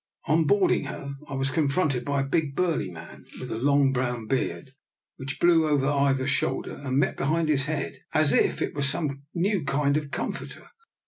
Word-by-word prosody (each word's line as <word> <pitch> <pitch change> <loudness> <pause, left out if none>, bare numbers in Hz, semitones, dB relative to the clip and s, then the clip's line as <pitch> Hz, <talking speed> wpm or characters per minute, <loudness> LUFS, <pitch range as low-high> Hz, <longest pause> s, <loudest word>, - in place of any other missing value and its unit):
On 160 +1 +3
boarding 200 +4 +3
her 140 0 -6 0.2
I 135 - -4
was 135 0 0
confronted 140 -3 +1
by 140 -1 0
a - - -1
big, 140 0 -1
burly 165 - 0
man 85 -2 -11 0.2
with - - -6
a 110 - -3
long 140 +1 +3
brown 125 -3 -2
beard, 135 +2 -2 0.5
which 135 0 -6
blew 165 -2 +4
over 145 -3 +2
either 140 -2 +2
shoulder 135 -1 -1
and 135 -2 -2
met 140 -1 +2
behind 155 +3 0
his 135 -3 +2
head 155 -1 -3
as 155 -2 +3
if - - +2
it - - -3
were 145 - -3
some 140 0 -2
new 190 0 +1
kind 140 +1 +1
of 150 -2 -4
com - - -2
forter. - - -9
140 Hz, 195 wpm, -26 LUFS, 135-155 Hz, 0.5 s, blew